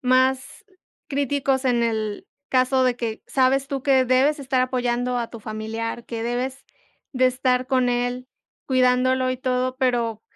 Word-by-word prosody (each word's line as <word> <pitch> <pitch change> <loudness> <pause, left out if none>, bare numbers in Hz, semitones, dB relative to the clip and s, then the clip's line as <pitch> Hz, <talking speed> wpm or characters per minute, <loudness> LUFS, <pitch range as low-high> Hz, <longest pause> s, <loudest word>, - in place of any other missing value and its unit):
más 260 0 +1 0.4
críticos 275 -1 0
en 245 -2 +2
el 220 -2 -2 0.2
caso 255 0 +2
de 250 -1 +1
que, 230 -2 -4
sabes 270 +1 +2
tú 275 -2 -3
que 265 -2 +4
debes 260 +4 +3
estar 265 -2 0
apoyando 250 -1 0
a 235 -1 -3
tu 230 - -9
familiar, 225 +2 -5
que 230 -1 -5
debes 250 +3 -3 0.5
de 255 0 +3
estar 255 0 +1
con 255 -2 +2
él 245 +1 -2 0.4
cuidándolo 255 0 +2
y 255 - -2
todo, 255 0 -1
pero 235 -4 0
255 Hz, 150 wpm, -23 LUFS, 240-260 Hz, 0.5 s, que